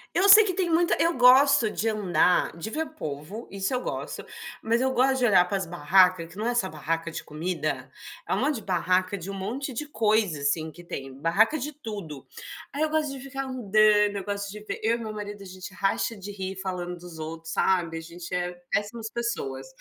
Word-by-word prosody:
Eu 375 +3 +4
sei 430 +2 +10
que 370 - 0
tem 360 -1 0
muita 335 +1 +3
eu 335 +1 +3
gosto 255 -1 +6
de 215 - -2
andar, 180 -6 +2
de 170 - -5
ver 315 +6 -2
povo, 155 - -6
isso 195 +4 -2
eu 250 - 0
gosto, - - -5 0.4
mas 230 +2 +2
eu 260 0 +2
gosto 265 +1 +2
de 250 - +3
olhar 190 -6 +5
para 195 +2 -1
as 190 - -3
barraca, 180 +2 +4
que 165 +3 -14
não 215 +2 -2
é 245 - 0
só 190 -6 +1
barraca 165 +1 -3
de - - -5
comida, 165 +3 -3 0.4
é - - 0
um - - 0
monte 300 - +1
de 220 - -5
barraca 185 +1 +1
de 185 +1 -7
um - - -4
monte 240 +8 -4
de 270 +6 -3
coisa, 215 - +1
assim, 155 +3 0
que 175 +2 -13
tem, 135 -5 -7
barraca 205 - +3
de 295 +3 -4
tudo. 205 - -8 0.5
Aí 285 - -3
eu 315 - +2
gosto 310 -2 0
de 275 - -7
ficar 270 +1 -5
andando, 215 -4 +3
eu 195 - -4
gosto 200 0 -3
de 210 +1 -9
ver - - -4
eu 225 +2 +2
e - - -10
meu 220 -2 -5
marido, 205 -1 -7
a - - -11
gente 185 +1 -9
racha 195 +4 0
de 205 0 -8
rir 190 -1 -5
falando 180 -2 -4
dos 175 -2 -11
outros, 165 +1 -6
sabe, 170 -4 +1
a - - -5
gente 170 +2 -9
é 180 0 -1 0.2
péssimas 220 +2 -2
pessoas. 135 - -3
200 Hz, 225 wpm, -26 LUFS, 175-240 Hz, 0.5 s, sei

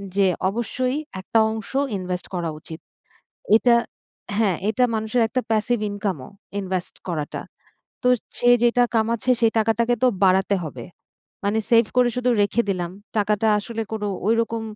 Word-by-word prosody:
যে 200 -1 +4 0.2
অবশ্যই 250 +4 -2 0.3
একটা 225 +4 +1
অংশ 220 -1 -6 0.3
ইনভেস্ট 180 -1 -4
করা 170 -2 -2
উচিত। 160 +1 -9 0.8
এটা 240 +1 +4 0.6
হ্যাঁ, 200 -6 +2
এটা 220 +4 +2
মানুষের 220 +2 0
একটা 255 +3 -1
passive 220 +1 +1
income 200 -5 -3
ও - - -12 0.3
ইনভেস্ট 185 -2 -3
করাটা। 155 -4 -3 0.6
তো - - +4 0.3
সে 245 - +4
যেটা 240 +1 +4
কামাচ্ছে 230 +2 +1
সে 230 - +5
টাকাটাকে 230 +2 +2
তো 255 - +6 0.2
বাড়াতে 190 +1 +3
হবে। 130 -6 -7 0.6
মানে 205 +2 +1
সেভ 230 0 +6
করে 250 -1 +5
শুধু 250 0 +1
রেখে 215 +3 +1
দিলাম 175 -3 -2 0.3
টাকাটা 210 +1 +2
আসলে 225 +2 -4
কোন 220 -1 -3 0.3
ওই 225 - +5
রকম 230 0 -4
220 Hz, 150 wpm, -23 LUFS, 190-235 Hz, 0.8 s, তো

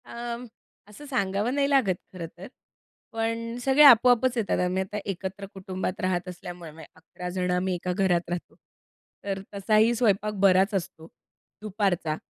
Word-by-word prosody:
अं, 235 +1 -6 0.4
असं 210 +8 -12
सांगावं 205 -3 -1
नाही 280 -1 +1
लागत, 260 -10 +3 0.2
खरं 180 -2 -6
तर. 185 - -9 0.6
पण 230 0 -3
सगळे 270 +2 +5
आपोआपच 250 -1 +6
येतात, 220 -4 0
आम्ही 185 +1 0
आता 210 +2 -7
एकत्र 195 0 -5
कुटुंबात 190 -1 -5
राहत 185 -1 -1
असल्यामुळे, 175 -2 -9
म्हणजे 160 0 -13
11 180 +2 -9
जण 180 0 -2
आम्ही 180 +1 0
एका 180 +1 -3
घरात 180 -2 +1
राहतो. 175 0 -5 0.7
तर 195 -1 -3
तसाही 215 +3 +3
स्वयंपाक 210 -3 +1
बराच 195 +1 +4
असतो 170 -3 -5 0.5
दुपारचा. 195 -7 -1
195 Hz, 145 wpm, -26 LUFS, 180-230 Hz, 0.7 s, आपोआपच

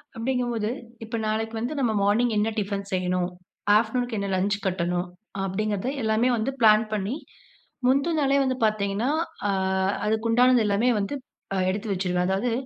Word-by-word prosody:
அப்பிடிங்கும்போது, 240 -2 -1 0.3
இப்ப 225 +1 -5
நாளைக்கு 225 +1 -2
வந்து 240 +6 -2
நம்ம 245 -4 +2
மார்னிங் 225 +4 +2
என்ன 210 +2 +2
டிஃபன் 200 -1 -3
செய்யணும். 180 -1 0 0.5
ஆஃப்டர்நூனுக்கு 230 +1 +1
என்ன 200 - -2
லஞ்ச் 200 +2 +1
கட்டணும். 175 -1 0 0.4
அப்டிங்கிறத 205 +3 -2 0.2
எல்லாமே 220 +3 +2
வந்து 225 +5 -1
பிளான் 215 -1 +6
பண்ணி, 210 +4 -1 0.7
முந்தி 275 +6 +3
நாளே 275 -1 +3
வந்து 260 -1 0
பார்த்தீங்கன்னா, 210 +2 0 0.4
அ - - +3 0.5
அதுக்கு 220 +2 0
உண்டானது 245 0 +5
எல்லாமே 210 +4 +2
வந்து 200 +8 -2 0.5
எடுத்து 205 +4 -3
வச்சுருவேன். 180 -1 0
அதாவது 195 +6 0
215 Hz, 140 wpm, -25 LUFS, 200-240 Hz, 0.7 s, பிளான்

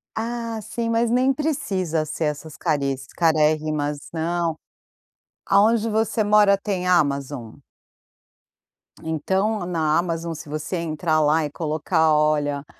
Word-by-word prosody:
Ah, 230 0 -3
sim, 230 +3 -4
mas 230 0 +1
nem 255 +3 +3
precisa 190 - -1
ser 155 +1 -3
essas 150 +1 -4
cariss 140 -5 -1
carérrimas 155 -2 +1
não. 165 0 -1 0.9
Aonde 215 +3 +3
você 220 0 +1
mora 205 -1 +5
tem 195 -2 -3
Amazon? 140 -8 0 1.4
Então 190 +6 -1
na 160 -3 +1
Amazon, 170 -1 -2
se 155 -1 -10
você 155 +4 -3
entrar 160 -1 0
lá 155 +1 +3
e 145 - -5
colocar 160 +1 +1
olha, 150 -2 +1
165 Hz, 115 wpm, -23 LUFS, 150-205 Hz, 1.4 s, mora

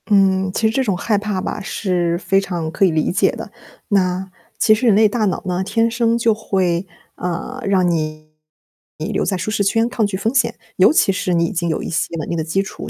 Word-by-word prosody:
嗯， 190 -2 +3
其 220 +3 +1
实 - - 0
这 265 - +1
种 200 -7 0
害 210 +3 0
怕 205 -2 -2
吧， 185 - -4
是 175 -4 -1
非 195 +2 +1
常 170 -5 -4
可 195 - +2
以 185 - +3
理 155 -1 0
解 180 - +2
的， - - -8 0.4
那， 190 -2 0 0.3
其 215 - +5
实 235 +3 +1
人 215 - +5
类 215 +1 +5
大 215 +1 0
脑 190 - -1
呢， 180 0 -1
天 225 +4 +1
生 230 0 +1
就 230 -1 +3
会， 190 -4 -1 0.3
呃， 180 +9 -4
让 190 -2 +2
你 155 -2 -3 0.7
留 - - -2
在 190 - -1
舒 185 +4 -3
适 210 -1 0
圈 225 +4 +2
抗 235 -3 0
拒 200 -2 -2
风 220 +5 -1
险， 270 - +2 0.2
尤 - - +6
其 300 - +3
是 185 -1 -1
你 170 0 +2
已 - - -3
经 175 -3 -1
有 160 - -2
一 - - -4
些 165 0 -2
稳 155 - -4
定 170 - -2
的 160 - -1
基 170 +5 0
础， 210 +2 -8
190 Hz, 250 characters per minute, -19 LUFS, 175-215 Hz, 0.7 s, 尤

